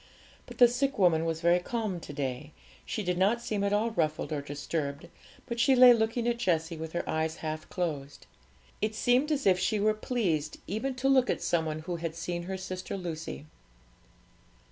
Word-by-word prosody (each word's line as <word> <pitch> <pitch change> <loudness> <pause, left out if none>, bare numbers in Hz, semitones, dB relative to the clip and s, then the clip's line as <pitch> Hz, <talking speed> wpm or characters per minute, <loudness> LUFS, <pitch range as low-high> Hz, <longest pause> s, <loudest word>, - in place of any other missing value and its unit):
But - - -11
the 245 - +8
sick 270 +4 -1
woman 170 -4 +3
was 165 0 -2
very 175 +1 +4
calm 215 -1 -3
to 160 - -9
day; 140 +1 -4 0.3
she 215 - -2
did 180 -1 -1
not 205 +5 +3
seem 210 -4 -2
at 200 - +1
all 215 +3 +1
ruffled 155 -5 -1
or 145 - -2
disturbed, 145 0 -4 0.4
but 235 0 -4
she 265 +3 +5
lay 250 -1 +9
looking 230 +1 0
at 235 0 0
Jessie 165 -6 0
with 160 0 -7
her 175 - -2
eyes 160 0 -1
half 155 0 -4
closed. 145 -5 -4 0.6
It 215 0 -1
seemed 250 +7 +2
as 285 -2 0
if 185 -2 +4
she 205 +4 +1
were 215 +1 +3
pleased 185 - -1
even 250 +7 -3
to 255 +1 -1
look 260 -2 +4
at - - -1
some 160 -2 +1
one 155 0 -3
who 170 +2 -4
had 165 -1 -4
seen 175 +1 -3
her 190 - -2
sister 185 +1 -5
Lucy. 165 -4 -6
180 Hz, 195 wpm, -29 LUFS, 160-230 Hz, 0.6 s, lay